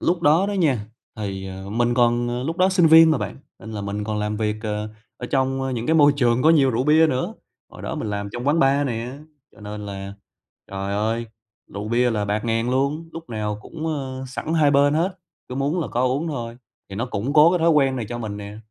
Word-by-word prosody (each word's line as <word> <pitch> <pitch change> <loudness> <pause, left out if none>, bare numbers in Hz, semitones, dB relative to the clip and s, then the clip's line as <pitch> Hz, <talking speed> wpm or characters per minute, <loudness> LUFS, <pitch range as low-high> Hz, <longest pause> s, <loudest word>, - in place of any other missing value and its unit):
lúc 170 -1 0
đó 160 +7 +4
đó 205 - -2
nha, 140 - +1 0.3
thì, 95 -2 -5
ờ, 95 +1 -8
mình 120 +2 +1
còn 120 0 +2
ờ, 120 +1 -2
lúc 165 +5 -3
đó 185 +1 +4
sinh 185 -3 +4
viên 160 0 +8
mà 155 - +2
bạn, - - -5 0.2
nên 110 +3 -9
là 105 - -4
mình 100 +1 -4
còn 105 -1 -2
làm 105 0 -2
việc, 105 -1 -1
ờ, 105 0 -3 0.3
ở 125 - -6
trong, 135 0 0
ơ, 135 - -2
những 120 -1 -3
cái 160 - +2
môi 145 -2 +6
trường 120 -2 +2
có 160 - +6
nhiều 140 -5 +4
rượu 125 +3 0
bia 155 +2 +5
nữa. 130 -4 -2 0.3
Hồi - - -13
đó - - -4
mình 105 - -4
làm 100 0 -3
trong 120 +2 -5
quán 160 +3 +3
bar 140 0 +3
nè, 120 +3 -4 0.3
cho - - -19
nên 105 0 -7
là 100 0 -6 0.6
trời 100 0 -4
ơi, 115 +3 -1 0.5
rượu 105 +2 -4
bia 120 +1 +2
là 105 -2 -1
bạt 105 +2 -2
ngàn 115 +1 0
luôn, 140 +5 -1
lúc 165 -5 -9
nào 105 -1 -3
cũng, 160 0 -7
ơ, 135 -4 -4
sẵn 155 +5 -4
hai 150 -3 +4
bên 145 +1 +4
hết, 180 +3 0 0.3
cứ 125 - -6
muốn 145 +6 0
là - - -3
có 120 - -1
uống 140 +6 0
thôi, 120 -5 -5 0.3
thì 95 - -7
nó 120 +4 -2
củng 125 +4 -3
cố 155 +2 +7
cái 180 - +2
thói 165 +1 +3
quen 135 -4 +3
này 115 -4 -3
cho 120 0 -5
mình 105 -3 -5
nè, 105 0 -8
125 Hz, 250 wpm, -22 LUFS, 105-150 Hz, 0.6 s, viên